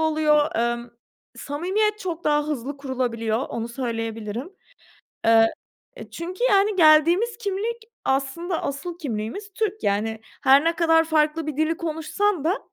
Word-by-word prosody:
oluyor. 305 -3 +2
Emm, 235 0 -1 0.5
samimiyet 390 +9 -1
çok 345 -4 -5
daha 295 0 +2
hızlı 285 -1 -4
kurulabiliyor, 240 -5 -2
onu 230 0 -4
söyleyebilirim. 230 - -4 0.7
Eee, 225 0 +5 0.4
eee, - - -10
çünkü 360 +7 -5
yani 405 -3 +3
geldiğimiz 345 +7 +5
kimlik, 440 +2 -2 0.3
aslında 280 +6 -1
asıl 280 +5 -4
kimliğimiz 275 - -5
Türk, 430 -1 -2
yani. 215 +2 0 0.2
Her 275 +2 +6
ne 330 +1 +1
kadar 325 -1 +4
farklı 315 0 +1
bir 300 -2 -4
dili 315 +2 +1
konuşsan 335 +2 -1
da 365 +8 +1
310 Hz, 130 wpm, -24 LUFS, 250-355 Hz, 0.7 s, Her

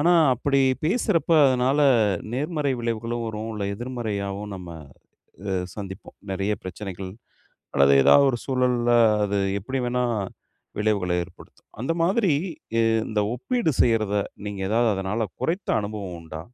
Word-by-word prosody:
ஆனா, 170 +4 +4 0.2
அப்படி 140 +3 +1 0.2
பேசுறப்போ 170 -3 +2
அதனால் 130 +3 +2 0.5
நேர்மறை 145 +2 -1
விளைவுகளும் 115 0 -2
வரும், 110 0 -4
இல்லை 105 -2 -3
எதிர்மறையாகவும் 105 -4 -4
நம்ம 90 -2 -9 0.7
இதை 95 -1 -3 0.2
சந்திப்போம். 95 -2 -8 0.2
நிறைய 100 +2 -1
பிரச்சனைகள் 95 0 -6 0.6
அல்லது 70 0 +5
ஏதாவது 140 - +6
ஒரு 120 - -3
சூழல்ல 125 -2 +1 0.3
அது 100 0 0 0.2
எப்படி 130 +7 -4
வேண்டுமானாலும் 120 -5 -1 0.5
விளைவுகளை 100 -4 +1
ஏற்படுத்தும். 85 - -15
அந்த 130 +7 0
மாதிரி 190 +1 +2 0.4
ய - - +4 0.3
இந்த 110 -1 0
ஒப்பீடு 235 - 0
செய்யறதை 110 -3 +2 0.2
நீங்க 100 -1 -5
ஏதாவது 115 +3 +2
அதனால் 100 +2 -2
குறைந்த 180 +5 -1
அனுபவம் 100 -4 -5
உண்டா? 80 -1 -8
115 Hz, 125 wpm, -24 LUFS, 100-130 Hz, 0.7 s, ஏதாவது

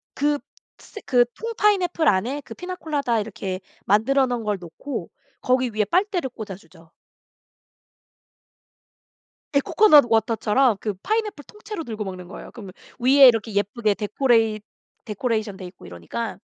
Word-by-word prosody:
그 290 0 +1 0.4
스 420 - -11
그 245 -2 +4
통 460 +1 -5
파인애플 360 -6 +2
안에 240 +9 +1
그 225 - -9
피나콜라다 300 -9 -2
이렇게 195 -3 -4 0.3
만들어 260 +7 +3
놓은 240 -2 -3
걸 210 -2 -1
놓고 175 - -7 0.3
거기 255 -1 +1
위에 215 -1 0
빨대를 360 - 0
꽂아 215 -6 -8
주죠. 165 -2 -19 2.6
예 280 - +6
코코넛 305 -4 +6
워터처럼 225 +1 +2
그 210 - -3
파인애플 430 -8 -2
통째로 420 -4 -8
들고 220 -5 -5
먹는 185 -2 -7
거예요. 190 - -10
그러면 200 -6 -10 0.3
위에 265 +2 +7
이렇게 225 -3 +2
예쁘게 205 +2 0
데코레잇 220 0 +1 0.4
데코레이션 215 -2 -2
돼 190 - -9
있고 180 0 -13
이러니까 85 -1 -6
230 Hz, 320 characters per minute, -23 LUFS, 205-285 Hz, 2.6 s, 위에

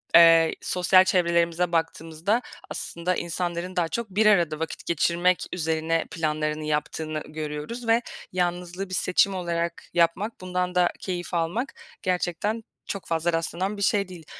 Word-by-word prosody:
eee, 165 -1 +7
sosyal 185 +1 +4
çevrelerimize 170 -1 +2
baktığımızda 165 +5 0 0.3
aslında 175 +2 -2
insanların 175 +1 -3
daha 170 -2 +2
çok 235 +4 -3
bir 205 +3 +2
arada 170 -7 +4
vakit 160 0 -5
geçirmek 175 +2 +2
üzerine 160 -1 0
planlarını 155 -1 -1
yaptığını 155 +1 -2
görüyoruz 155 +10 -5
ve 230 +1 +4 0.3
yalnızlığı 180 +1 -2
bir - - -7
seçim 190 +2 +3
olarak 170 -1 -2
yapmak, 175 +7 +1
bundan 180 0 -2
da 180 -1 +4
keyif 180 -1 -4
almak 175 +10 -1 0.3
gerçekten 185 +5 -1 0.2
çok 195 - -4
fazla 165 +1 0
rastlanan 175 +5 -1
bir - - -6
şey 200 0 +2
değil. 175 -3 -11
175 Hz, 140 wpm, -25 LUFS, 165-185 Hz, 0.3 s, eee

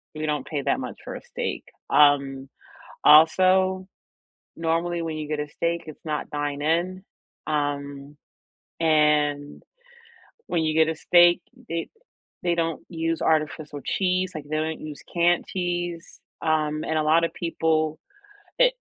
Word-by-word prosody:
we 155 - -3
don't 150 -1 -1
pay 145 -3 -3
that - - +1
much 125 - -6
for - - -6
a - - -8
steak. - - -4 0.3
Um, 140 -2 +3 0.6
also, 185 +4 +5 0.7
normally, 165 +1 -1
when 160 -1 -4
you 155 - -4
get 150 -1 -2
a 150 - -4
steak, 170 +2 -2
it's 155 +1 -11
not 150 -1 -3
dine 145 -1 -3
in, 175 +4 0 0.4
um, 145 -1 -3 0.6
and, 150 -2 +2 0.9
when 165 -2 0
you 155 0 0
get 160 0 +4
a 160 - -5
steak, 175 +1 +5 0.3
it 165 0 -3 0.6
they 175 -1 +1
don't 165 -1 -1
use 165 -1 -2
artificial 155 -2 -1
cheese, 185 -1 0
like, 155 - -5
they 155 - -1
don't 160 +1 -2
use 150 -2 -8
canned 175 0 +2
cheese, 175 -2 -4 0.2
um, 155 -1 0
and 160 - -1
a 155 - +1
lotta 165 +2 +3
people 160 -2 0 0.6
it - - +5
160 Hz, 145 wpm, -24 LUFS, 150-170 Hz, 0.9 s, also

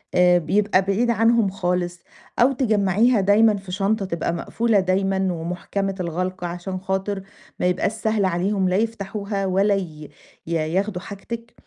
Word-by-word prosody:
آآ 180 0 +5
بيبقى 200 +3 +2
بعيد 200 +5 0
عنهم 225 -2 +3
خالص 180 -2 -2 0.4
أو 245 +3 +5
تجمّعيها 220 -2 +2
دايمًا 210 +2 +4
في 195 -2 -9
شنطة 200 +2 0
تبقى 170 -2 -2
مقفولة 225 +5 +1
دايمًا 190 +1 +1
ومُحكَمة 180 +4 -3
الغَلق 180 +2 -3
عشان 175 +2 -4
خاطر 190 +1 -2 0.4
ما - - 0
يبقاش 180 +2 +1
سهل 215 -2 0
عليهم 185 +1 0
لا 180 - +1
يفتحوها 205 -2 -2
ولا 195 +2 +2
ي 155 -6 -6 0.4
ي 170 - -3
ياخدوا 180 +4 -1
حاجتِك. 230 +4 -8
195 Hz, 145 wpm, -22 LUFS, 180-210 Hz, 0.4 s, آآ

